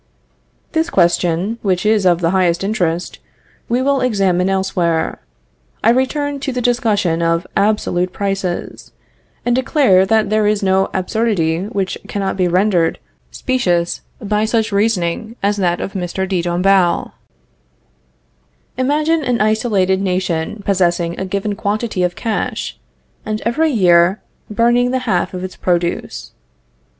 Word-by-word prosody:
This 325 +1 0
question, 175 - +1
which 185 -1 0
is 210 -3 +3
of 175 -1 +3
the 165 0 +2
highest 185 -2 +1
interest, 180 -4 -2 0.5
we 245 +2 +1
will 275 -1 +1
examine 195 -6 +1
elsewhere. 180 -4 0 0.6
I 225 - +5
return 285 +3 0
to 275 0 -3
the 250 - -3
discussion 215 -8 +1
of 165 +1 +1
absolute 195 -3 +1
prices, 195 -2 -4 0.5
and 240 0 +2
declare 255 -8 +3
that 215 -1 +2
there 215 -1 +2
is 210 0 +1
no 190 0 +2
absurdity 185 -4 0
which 200 -3 -3
cannot 195 -1 -2
be 185 -2 +1
rendered 180 -1 +2 0.3
specious 175 -10 -1 0.2
by 210 -1 0
such 225 0 0
reasoning 205 +1 0
as 205 +1 +1
that 175 -3 0
of 195 - -5
Mr. 190 0 -3
de 185 -2 0
Dombasle. 175 +1 +2 1.7
Imagine 305 +4 +1
an 250 -3 0
isolated 210 -3 +1
nation 185 +1 -2
possessing 175 -3 0
a 190 - -2
given 200 +2 -2
quantity 215 -1 -2
of 180 0 0
cash, 225 -2 -3 0.5
and 215 -1 -3
every 310 +8 +2
year 180 - +4 0.3
wantonly 210 - -8
burning 240 +2 +3
the 260 +1 0
half 185 -4 0
of 180 - -5
its 185 - -6
produce. 175 -1 -2
195 Hz, 135 wpm, -17 LUFS, 180-225 Hz, 1.7 s, I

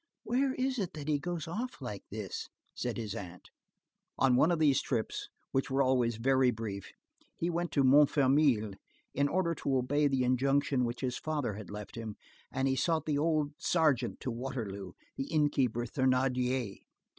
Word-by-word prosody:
"Where 260 +2 +1
is 260 -1 -1
it 185 -3 -2
that 150 -1 -6
he 150 -2 +2
goes 175 -1 -4
off 235 +9 -4
like 105 -7 -5
this?" 105 -3 -5 0.2
said 120 -2 -3
his 110 -4 -4
aunt. 90 -5 -8 0.7
On 130 -2 +4
one 155 - +5
of 170 - +2
these 145 -4 +4
trips, 110 - -2 0.2
which 135 - 0
were 135 +1 +3
always 125 -3 +2
very 130 +2 +3
brief, 110 -4 -4 0.5
he 170 +1 -1
went 175 +1 -2
to 140 - +3
Montfermeil, 135 -4 +4 0.4
in 140 0 +2
order 170 +2 +1
to 135 -4 0
obey 145 +4 +2
the 135 -2 +1
injunction 135 +1 +2
which 120 +1 -4
his 125 -2 -2
father 150 -8 -2
had 105 +1 -8
left 105 0 -7
him, 110 -3 -6 0.4
and 135 +1 0
he 135 - +2
sought 160 +3 +1
the 145 -2 0
old 155 -2 +1
sergeant 150 -9 +2
to 130 - -2
Waterloo, 110 -7 -5 0.2
the 135 - -2
inn 150 -2 +3
keeper 120 -4 +1
Thénardier. 125 -3 0
135 Hz, 175 wpm, -32 LUFS, 120-150 Hz, 0.7 s, one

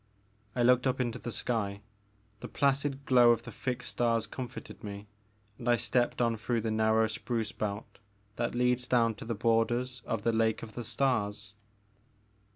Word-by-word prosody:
I 120 - +2
looked 125 +2 +4
up 130 0 0
into 120 -3 -1
the 120 - -5
sky. 105 -3 -2 0.6
The - - -7
placid 140 0 0
glow 125 -2 +6
of 115 -1 +3
the - - -8
fixed 125 -1 -3
stars 115 -2 +1
comforted 125 -3 -8
me 100 0 -7 0.5
and 120 -1 -2
I 120 - +6
stepped 120 +1 0
on 115 -1 +1
through 115 +2 -1
the 110 0 -2
narrow 110 0 +3
spruce 115 0 -3
belt 105 -1 -5 0.4
that 120 0 -2
leads 125 0 +2
down 115 -2 +3
to 110 - -10
the 115 0 -2
borders 120 +3 +1
of 115 -3 -2
the 115 - +2
Lake 110 -1 +1
of 110 -1 -9
the 120 - -5
Stars. 105 -4 -1
115 Hz, 170 wpm, -30 LUFS, 110-125 Hz, 0.6 s, glow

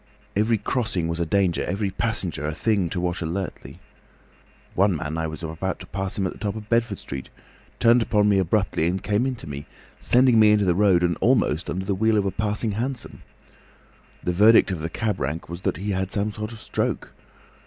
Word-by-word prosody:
Every 110 +3 +2
crossing 105 -5 -1
was 85 0 -2
a 85 - 0
danger, 95 -2 +1
every 100 +2 -2
passenger 95 -8 -2
a 75 - -3
thing 100 -2 +1
to 90 - -3
watch 90 0 -2
alertly. 85 +3 -5 0.9
One 100 0 +3
man 80 0 -4
as 80 - -1
I 80 - -1
was 80 +2 -7
about 80 +4 -3
to - - -9
pass 95 0 -3
him 95 - 0
at 95 - -2
the - - -15
top 105 -1 -2
of 105 -1 -8
Bedford 115 -3 +1
Street, 65 -1 -7 0.5
turned 120 +1 +5
upon 105 -2 +2
me 100 -2 +4
abruptly 95 -2 +1
and 90 +2 -2
came 105 +5 +1
into 125 -8 -5
me, 70 -1 -7 0.3
sending 125 -2 +4
me 105 -1 +7
into 105 -1 +3
the 90 - +3
road 95 -2 +3
and 85 0 +1
almost 110 - +2
under 95 +2 -3
the 100 - 0
wheel 110 +3 +2
of 100 - +1
a 95 - 0
passing 105 +2 -1
hansom. 120 +4 -4 1.0
The 90 - 0
verdict 105 +2 +6
of 90 - -3
the 80 - -3
cab 105 +1 -2
rank 80 +3 -3
was 85 +1 -6
that - - -1
he 100 +2 -3
had 95 - 0
had 95 +1 -3
some 105 +1 -1
sort 105 +1 -5
of 115 - -10
stroke. - - -2
100 Hz, 215 wpm, -24 LUFS, 85-110 Hz, 1.0 s, me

